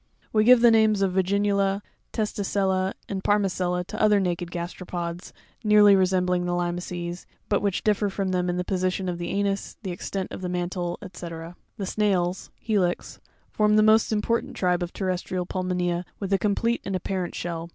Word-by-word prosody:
We 215 -1 +4
give 250 0 +7
the 235 -1 +7
names 215 -3 +4
of 190 -2 +1
Vacinuta, 200 +1 +1 0.3
TEsracriza, 195 -3 0
and 195 -1 -4
Parma 205 -1 +3
CELLA 180 -1 -1
to 215 +4 -6
other 210 -1 +5
naked 175 -2 -1
gasteropods, 175 0 -5 0.3
nearly 210 -2 +7
resembling 180 -1 +2
the 175 0 0
limaces, 175 0 -3 0.2
but 205 - +2
which 200 -3 -1
differ 210 -1 +2
from 195 0 -2
them 180 -1 0
in 175 - -1
the 180 - 0
position 185 0 -1
of 175 -1 -3
the 175 0 -3
anus, 200 0 -1
the 190 - -3
extent 185 +2 -4
of - - -7
the 180 - -3
mantie, 175 0 -2 0.2
&c. 175 - -7
15. 165 +1 -8 0.2
The 200 - -3
Snarrs—Helix—form 195 +2 -1
the 215 - +5
most 220 +1 +4
important 220 +2 0
tribe 180 -1 +1
of 175 0 -3
terrestrial 185 -1 -2
pulmonea 180 -1 -1 0.2
with 195 -1 -2
a 195 - +3
complete 230 +3 +1
and 195 - -3
apparent 185 -1 -3
shell. 170 -1 -4
185 Hz, 170 wpm, -25 LUFS, 180-205 Hz, 0.3 s, give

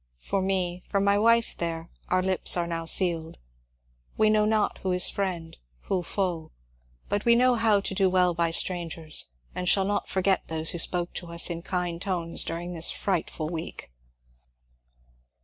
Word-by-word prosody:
For 195 - -2
me, 185 -2 -1
for 200 - +1
my 200 +1 +3
wife 230 +1 +3
there, 165 -1 -4 0.2
our 185 0 +2
lips 185 -1 +3
are 175 - +1
now 165 -1 -3
sealed; 165 -2 +1 0.8
we 215 0 +4
know 215 -1 +3
not 215 -1 +1
who 190 - -2
is 180 0 +2
friend, 175 -5 -3 0.3
who 190 -2 -1
foe; 175 -3 -2 0.6
but 205 0 -1
we 235 0 +5
know 250 +1 +4
how 220 -3 +3
to 195 - -2
do 190 -1 +3
weU 180 -1 +3
by 170 0 +1
strangers, 165 - -3 0.3
and 180 0 -1
shall 195 -1 +3
not 205 +1 -1
forget 190 0 +1
those 160 0 -3
who 175 - -4
spoke 175 +1 -1
to 175 - -6
us 170 +1 +1
in 170 0 -4
kind 175 -1 -3
tones 175 -4 0
during 175 +2 -4
this 165 0 +3
frightful 165 -4 -2
week. 160 - -6
180 Hz, 170 wpm, -27 LUFS, 170-195 Hz, 0.8 s, we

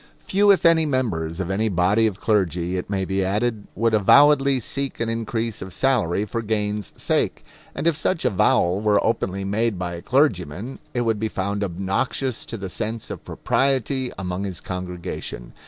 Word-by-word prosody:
Few 205 +2 +2
if 195 -3 +5
any 165 -1 +5
members 95 - -1
of 95 0 -2
any 110 +3 +1
body 100 +5 +3
of 100 -3 -4
clergy, 90 -5 0
it 90 - -4
may 95 -2 -1
be 95 +1 0
added, 105 +3 -1
would 115 +1 +1
avowedly 140 +5 +5
seek 135 +3 -3
an 115 -1 -1
increase 115 0 -2
of 95 -2 -6
salary 105 -8 +1
for 115 +2 -3
gain's 105 -2 -2
sake; - - 0 0.3
and - - -3
if 170 -2 +3
such 160 0 -1
avowal 95 -4 +2
were 105 -1 +3
openly 100 -4 -1
made 105 +2 0
by 90 -1 -3
a 85 - -6
clergyman, 115 - 0 0.2
it 120 - +1
would 115 -3 0
be 110 0 -1
found 100 +1 -2
obnoxious 100 +7 -2
to 115 - -5
the 95 -2 -5
sense 110 +4 -4
of - - -7
propriety 135 -1 0
among 90 0 -3
his 95 -4 -4
congregation. 90 -9 -6
105 Hz, 175 wpm, -23 LUFS, 95-120 Hz, 0.3 s, if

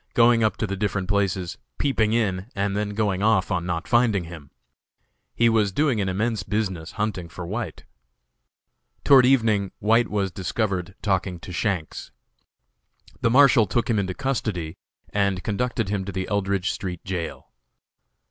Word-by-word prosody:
going 115 -1 +5
up 110 - +1
to - - -1
the 100 -1 -3
different 95 -1 -2
places, 95 -3 -1 0.2
peeping 115 -6 +1
in, 100 -4 0
and 100 0 -1
then 105 0 -2
going 100 -3 0
off 110 0 +2
on 90 -1 -1
not 85 -2 -3
finding 120 -6 +3
him. 80 -4 -10 0.9
He 115 - +4
was 110 -3 +2
doing 130 -1 +1
an 95 - -1
immense 110 +3 -1
business 95 -4 -3
hunting 100 -5 -3
for 90 +3 -7
White. 100 - -5 1.2
Toward 130 -3 +7
evening 110 -7 +2
White 115 +2 +3
was 100 -2 -1
discovered 95 -1 -2
talking 95 -3 0
to 100 -2 -9
Shanks. 90 -4 -2 1.1
The - - +3
Marshal 130 -3 +6
took 120 +4 0
him 110 - +2
into 95 -2 -2
custody 110 - -2 0.4
and 100 -2 0
conducted 115 -1 -1
him 100 -2 -1
to 100 - -4
the 95 -1 -3
Eldridge 100 -2 0
street 90 -3 -6
jail. 90 -3 -5
100 Hz, 155 wpm, -24 LUFS, 95-110 Hz, 1.2 s, Toward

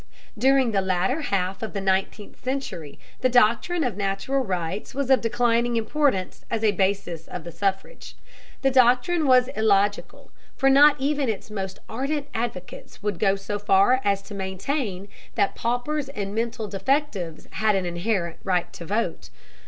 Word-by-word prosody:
During 265 +1 +3
the 195 -2 +1
latter 190 - 0
half 190 -7 -1
of 220 - -5
the 200 - -2
nineteenth 195 +2 -2
century 255 - -4 0.2
the 255 - +2
doctrine 245 +8 +3
of 245 -7 -1
natural 200 +7 -1
rights 185 +1 -4
was 275 -1 -1
of 265 - +5
declining 235 +1 +1
importance 225 -4 0
as 225 -1 -2
a 215 - +4
basis 190 -4 -1
of - - -7
the 170 - -8
suffrage. 195 - -3 0.5
The 270 - +4
doctrine 260 +6 +3
was 255 -1 +5
illogical, 205 -2 0 0.2
for 270 -1 +3
not 290 +2 +6
even 280 -1 0
its 215 0 -4
most 190 -2 -4
ardent 280 +5 -3
advocates 225 -7 -6
would 205 -5 -2
go 195 0 +3
so 200 +1 -4
far 205 +6 +4
as 200 -1 +1
to 205 - -11
maintain 195 +1 -3 0.3
that 200 - +1
paupers 260 +5 -2
and 200 -7 -5
mental 230 0 -2
defectives 195 - -2
had 215 -1 +1
an 190 -2 0
inherent 175 0 -2
right 180 -3 0
to 170 - -8
vote. 210 +6 -2
215 Hz, 160 wpm, -24 LUFS, 195-260 Hz, 0.5 s, not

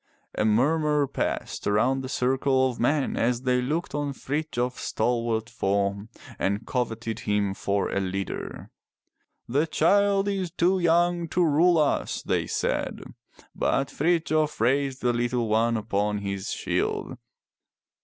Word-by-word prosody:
A - - 0
murmur 150 +6 +2
passed 140 - -3
around 125 +6 +2
the 130 - -6
circle 130 0 +2
of 125 -2 -5
men 140 +3 +1
as 120 +1 0
they 125 -1 +2
looked 155 +7 -2
on 145 -1 -2
Frithjof's 130 -3 -3
stalwart 115 -2 -1
form 100 +2 -1 0.3
and 100 +3 -1
coveted 115 -3 -2
him 105 -2 0
for 100 0 -1
a - - 0
leader. 95 0 -4 0.8
"The 145 +7 +1
child 200 +5 +3
is 195 -3 -1
too 180 +3 +1
young 175 0 +2
to 175 +2 +1
rule 165 +3 +4
us," 150 -2 0
they - - 0
said. - - -2 0.4
But 135 0 0
Frithjof 155 -1 +1
raised 135 +3 +1
the 120 -1 +2
little 120 0 0
one 115 +2 +2
upon 105 -1 -1
his 100 -1 -4
shield. - - -2
130 Hz, 135 wpm, -26 LUFS, 110-155 Hz, 0.8 s, rule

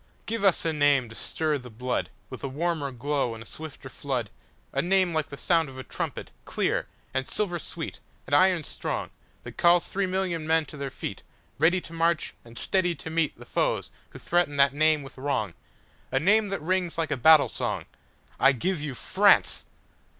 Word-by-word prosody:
Give 225 -2 -3
us 195 -4 +4
a 165 - +1
name 145 -5 +3
to - - -10
stir 155 +2 -1
the 125 -1 -11
bloodWith 125 +2 -5
a - - -3
warmer 150 0 -1
glow 135 -1 -1
and 115 - -9
a - - -18
swifter 155 0 -8
flood,—A 130 -5 -5
name 185 -1 +2
like 155 -2 -1
the 140 - -8
sound 165 -2 +2
of 130 - -11
a 130 - -6
trumpet, - - -5
clear, - - -1 0.3
And 135 0 -1
silver 180 -5 -1
sweet, - - -6 0.3
and 145 - -6
iron 180 +1 +4
strong, - - -3 0.3
That - - -10
calls 175 0 +4
three 195 0 -1
million 180 -4 -1
men 160 -1 +3
to 150 - -11
their 140 -1 -3
feet, - - -6 0.4
Ready 170 +4 +4
to 165 - -11
march, 165 0 +1
and 115 0 -14
steady 180 -3 +1
to 160 - -8
meetThe 155 -7 -1
foes - - -1 0.2
who - - -11
threaten 175 -4 +1
that 140 -1 +5
name 155 0 +3
with 135 -1 -12
wrong,—A 130 0 -4
name 210 +7 +4
that 195 -6 -3
rings 180 0 0
like 165 -1 -1
a - - +2
battle 150 +3 +7
song.I 135 - -1
give 170 +6 -1
you 145 -4 -4
France! - - +3
155 Hz, 180 wpm, -27 LUFS, 135-175 Hz, 0.4 s, battle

